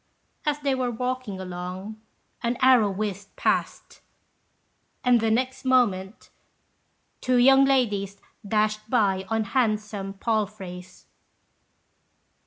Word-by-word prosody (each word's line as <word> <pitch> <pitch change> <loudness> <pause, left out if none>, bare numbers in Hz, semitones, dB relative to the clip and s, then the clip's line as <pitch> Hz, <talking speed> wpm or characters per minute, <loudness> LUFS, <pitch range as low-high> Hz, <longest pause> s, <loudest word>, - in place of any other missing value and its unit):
As 295 -1 +2
they 280 -1 +1
were 255 -1 -1
walking 250 -4 -3
along, 185 +4 -7 0.4
an 235 +1 -1
arrow 255 -5 +5
whizzed 200 0 -5
past, - - -2 1.0
and 245 -1 +4
the 225 - +1
next 255 +4 -1
moment 225 -6 +1 0.9
two 255 0 +1
young 270 +2 +6
ladies 205 -7 0 0.2
dashed 215 +1 0
by 195 -6 +1
on 225 0 +1
handsome 210 -4 -1
palfreys. 195 -4 -4
215 Hz, 100 wpm, -25 LUFS, 195-250 Hz, 1.0 s, young